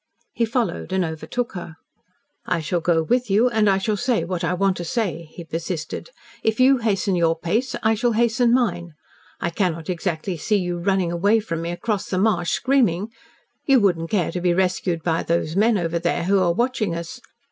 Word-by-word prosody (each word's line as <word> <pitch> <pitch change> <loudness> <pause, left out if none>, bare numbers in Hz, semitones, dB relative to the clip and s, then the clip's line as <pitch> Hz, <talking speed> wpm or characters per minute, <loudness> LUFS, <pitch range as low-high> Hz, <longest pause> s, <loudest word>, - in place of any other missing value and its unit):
He 235 - +1
followed 230 -4 -2
and 190 -1 +1
overtook 165 +10 -4
her. 170 -3 -8 0.7
"I 180 - +1
shall 165 +3 -1
go 165 -1 +2
with 245 +6 0
you, 220 +6 +4
and 215 -3 +3
I 195 - +3
shall 210 +2 0
say 245 -6 +1
what 175 0 -3
I 165 - +1
want 195 0 +1
to 175 - -4
say," 175 -5 -2
he 170 - -9
persisted. 165 - -5 0.3
"If 220 +1 0
you 260 +1 +5
hasten 200 -4 0
your 165 -1 +2
pace 220 +11 -1
I 220 0 +4
shall 235 +2 +1
hasten 235 +1 +2
mine. 175 -10 0 0.4
I 170 - -2
cannot 170 -2 -1
exactly 175 0 -3
see 210 +7 +1
you 175 -2 -2
running 185 -1 +1
away 200 +6 +3
from 165 -7 -4
me 170 - -3
across 205 +3 -2
the 185 - -1
marsh, 185 -4 +1
screaming. 225 -7 +1 0.6
You 270 -2 +6
wouldn't 170 -6 +1
care 185 -6 0
to 180 - -4
be 175 -1 +2
rescued 180 -2 0
by 165 -1 +1
those 165 -1 -1
men 215 +2 +3
over 170 -2 -1
there 170 0 0
who 195 +3 +3
are 180 -2 +3
watching 225 -3 0
us. 170 +9 -7
185 Hz, 200 wpm, -22 LUFS, 170-220 Hz, 0.7 s, You